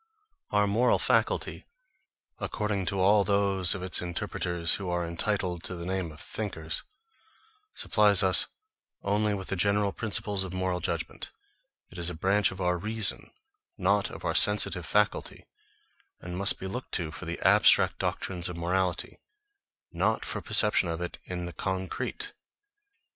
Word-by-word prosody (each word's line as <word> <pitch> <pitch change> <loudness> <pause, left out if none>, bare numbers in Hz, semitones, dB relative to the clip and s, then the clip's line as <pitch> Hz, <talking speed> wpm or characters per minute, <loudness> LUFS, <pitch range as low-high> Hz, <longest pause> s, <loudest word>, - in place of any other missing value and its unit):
Our 105 0 +2
moral 115 +5 +2
faculty, - - 0 0.7
according 105 -4 -2
to 100 -1 -1
all 100 +2 +4
those 100 -2 +1
of 95 - -6
its 95 - 0
interpreters 85 -1 -1
who 95 -3 -5
are 90 0 -1
entitled 90 0 -2
to 90 - -3
the 85 -1 -7
name 95 -3 -2
of 75 - -14
thinkers, 80 -7 -3 0.9
supplies - - +4
us - - +4 0.6
only 105 +1 0
with 95 -1 -7
the 95 - -1
general 100 +2 +1
principles 105 -2 -1
of 95 -1 -7
moral 95 -1 -1
judgments; - - -4 0.6
it - - -9
is 85 0 +3
a 90 - -6
branch 100 +5 +2
of 95 - -9
our 90 -1 0
reason, 110 +2 +3 0.5
not 100 +2 +1
of - - -9
our - - 0
sensitive 100 -5 +3
faculty; 105 +6 0 0.7
and 90 0 -7
must 100 +2 +5
be - - -8
looked 120 +7 -6
to 80 -3 -2
for - - -8
the - - -5
abstract - - +5
doctrines 90 -2 -3
of 90 - -7
morality, 90 +1 -1 0.7
not - - 0
for - - -3
perception 105 -4 +4
of 85 0 -3
it 90 0 -5
in 90 -1 -5
the 85 - -7
concrete. 95 - -4
95 Hz, 155 wpm, -28 LUFS, 90-100 Hz, 0.9 s, must